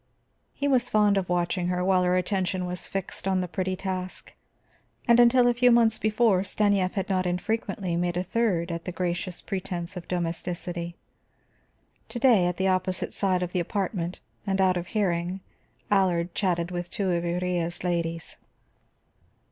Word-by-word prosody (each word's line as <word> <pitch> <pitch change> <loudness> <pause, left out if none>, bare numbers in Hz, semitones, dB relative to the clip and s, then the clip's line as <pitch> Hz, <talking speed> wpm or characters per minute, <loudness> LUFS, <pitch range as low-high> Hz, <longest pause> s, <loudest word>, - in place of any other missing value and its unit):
He 285 - -1
was 250 -3 +2
fond 210 -1 +4
of 190 -2 -1
watching 175 0 0
her 180 0 0
while 185 -1 +4
her 180 0 +2
attention 185 0 -1
was 180 0 -4
fixed 195 -1 -4
on 190 -1 +2
the 180 - -1
pretty 185 +2 -2
task; 185 -1 -5 0.7
and 235 0 +6
until 240 +1 +6
a 245 - +4
few 245 +1 +4
months 230 -2 +4
before 215 -3 +3
Stanief 200 -1 +1
had 195 -3 -2
not 185 -2 0
infrequently 185 0 -2
made 175 0 0
a 180 - 0
third 185 -4 0
at 170 0 -5
the 180 - -3
gracious 180 0 -3
pretense 185 -2 -4
of 175 -2 -7
domesticity. 175 0 -3 1.1
To - - -5
day, 235 -8 +5
at 180 - -2
the 190 - +1
opposite 185 0 0
side 185 -2 +1
of 180 - -4
the 180 - 0
apartment 180 -1 -2 0.3
and 195 0 0
out 185 -1 +4
of 175 0 -3
hearing, 185 -3 -1 0.5
Allard 180 -3 +2
chatted 175 -3 0
with 175 -1 -4
two 195 -3 -1
of 170 -1 0
Iría's 175 0 -1
ladies. 170 -2 -2
185 Hz, 165 wpm, -26 LUFS, 175-195 Hz, 1.1 s, and